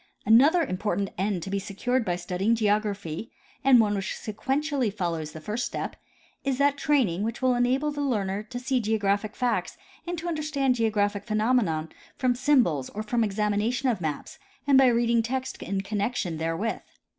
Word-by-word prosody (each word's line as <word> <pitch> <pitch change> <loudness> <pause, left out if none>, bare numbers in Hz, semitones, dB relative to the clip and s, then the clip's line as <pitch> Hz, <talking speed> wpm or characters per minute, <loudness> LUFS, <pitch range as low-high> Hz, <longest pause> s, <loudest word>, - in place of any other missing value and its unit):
Another 280 - +6
important 200 - -2
end 190 -2 -1
to 195 - -6
be 200 - 0
secured 220 +6 -1
by 180 -4 -1
studying 185 +5 0
geography, 210 -4 -1 0.3
and 265 -2 +7
one 210 -2 +3
which 195 -2 -2
sequentially 270 +2 -1
follows 170 -6 -3
the 160 - -9
first 210 +9 -3
step, - - -4 0.5
is 270 -2 0
that 280 0 +3
training 260 - +1
which 225 +2 -2
will 255 -1 +3
enable 255 +5 +1
the 290 0 -4
learner 205 -7 -1
to 215 +3 -8
see 255 +1 0
geographic 210 -1 0
facts 245 -1 -1 0.3
and 350 0 -3
to 335 +2 -5
understand 300 -5 0
geographic 205 -3 0
phenomena 215 -8 +1 0.3
from 255 -3 +2
symbols 245 - +2
or 215 - -5
from 230 +2 0
the 220 - +3
examination 210 +5 0
of 220 -7 -1
maps 155 -3 -4 0.3
and 280 -1 +4
by 265 0 +7
reading 235 -1 +3
text 260 +3 -4
in 195 0 -2
connection 200 -4 -2
there 165 +1 -2
with. 225 +4 -2
220 Hz, 175 wpm, -26 LUFS, 200-255 Hz, 0.5 s, and